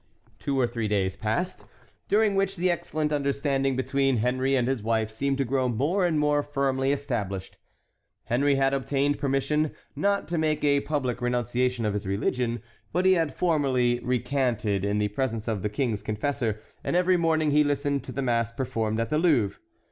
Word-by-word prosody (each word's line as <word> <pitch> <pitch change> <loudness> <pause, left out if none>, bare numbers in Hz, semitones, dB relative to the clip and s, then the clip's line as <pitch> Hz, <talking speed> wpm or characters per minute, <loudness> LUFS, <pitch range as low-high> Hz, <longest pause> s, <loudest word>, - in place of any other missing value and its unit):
Two 140 -1 -1
or 125 - +4
three 115 -2 -2
days 95 -2 0
passed, 110 - -2 0.4
during 210 0 +3
which 195 0 +1
the 180 0 +1
excellent 155 -3 -2
understanding 140 -1 0
between 135 0 +1
Henry 130 +4 +1
and 125 -2 +1
his 130 -3 -1
wife 110 0 0
seemed 135 +5 -1
to 135 - 0
grow 130 0 0
more 155 - +1
and 160 -3 0
more 150 0 +2
firmly 135 -2 0
established. 115 -10 -3 0.6
Henry 140 +4 +2
had 135 0 +2
obtained 140 +1 0
permission 140 +3 +1 0.3
not 200 0 0
to 170 -1 0
make 155 -1 0
a 140 -1 +4
public 130 -5 -2
renunciation 125 0 0
of 105 - 0
his 105 -1 -3
religion; 115 +4 -1 0.3
but 180 +3 0
he 190 - +6
had 165 -6 0
formally 130 -8 +2
recanted 125 -5 0
in 100 +1 0
the 105 0 +1
presence 115 0 -2
of 110 -4 -1
the 105 - -1
king's 110 -1 -1
confessor, 110 0 -2 0.2
and - - -1
every 180 +1 +4
morning 160 -3 +2
he 150 +1 +5
listened 145 -1 0
to - - -8
the 135 +2 -3
mass 115 -2 +1
performed 115 -3 -2
at 115 +5 -2
the 155 - +2
Louvre. 145 - +2
135 Hz, 180 wpm, -26 LUFS, 115-145 Hz, 0.6 s, he